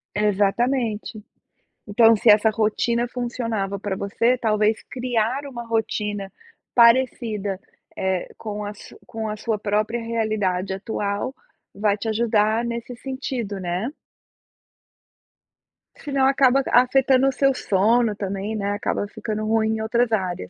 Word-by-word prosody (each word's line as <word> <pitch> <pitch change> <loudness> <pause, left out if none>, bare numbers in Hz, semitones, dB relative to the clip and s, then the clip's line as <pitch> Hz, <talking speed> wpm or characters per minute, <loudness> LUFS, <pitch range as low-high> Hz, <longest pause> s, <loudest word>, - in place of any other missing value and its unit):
Exatamente. 210 +2 0 0.6
Então, 225 +2 +5
se 235 +3 +1
essa 210 +1 +5
rotina 230 +2 0
funcionava 230 -5 -3
pra 195 -1 -3
você, 230 +6 +1
talvez 215 -2 +1
criar 250 +2 -1
uma 240 -3 -7
rotina 210 -3 -2 0.4
parecida, 230 -5 +3 0.4
eh, 190 -1 -1
com 210 -1 -5
a 205 0 -5
su - - -14
com 225 -1 -5
a 210 - -4
sua 220 0 -2
própria 215 +3 -1
realidade 210 -5 -1
atual, 205 +4 -3 0.4
vai 205 0 +1
te 225 - -5
ajudar 220 0 +2
nesse 235 +1 -5
sentido, 255 -6 -4
né? 180 +5 -2 2.1
Se 290 - -8
não 275 -1 +2
acaba 270 0 +4
afetando 260 +1 +4
o 270 - +1
seu 275 +1 +3
sono 220 +1 +2
também, 200 +2 -4
né, 200 -1 -2
acaba 205 0 -2
ficando 215 0 -4
ruim 220 0 +1
em 220 - -4
outras 235 +2 +1
áreas. 180 - -2
220 Hz, 130 wpm, -23 LUFS, 205-240 Hz, 2.1 s, Então